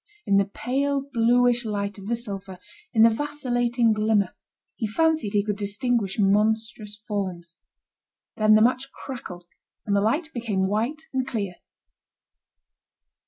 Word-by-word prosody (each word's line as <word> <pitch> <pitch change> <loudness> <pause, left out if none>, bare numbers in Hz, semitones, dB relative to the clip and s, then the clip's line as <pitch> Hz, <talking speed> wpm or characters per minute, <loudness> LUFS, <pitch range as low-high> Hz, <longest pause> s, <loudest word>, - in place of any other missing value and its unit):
In 195 - +3
the 200 - +4
pale 275 +6 -1
bluish 245 +1 +3
light 205 -1 -3
of 195 - -9
the 235 - +1
sulphur, 200 -5 -6 0.3
in 220 -2 +5
the 230 - +8
vacillating 245 -3 0
glimmer, 215 -3 +1 0.4
he 225 - -2
fancied 315 -2 +1
he 205 -1 +3
could 210 -1 -2
distinguish 205 0 -1
monstrous 210 +1 +1
forms. 185 -5 -5 0.8
Then 215 0 +5
the 215 - +6
match 255 +3 +1
crackled, 180 -10 -8 0.4
and 200 - +1
the 200 - +3
light 300 - 0
became 215 -6 -1
white 235 +10 -1
and 260 -1 -1
clear. 200 -7 -3
220 Hz, 135 wpm, -25 LUFS, 200-245 Hz, 0.8 s, the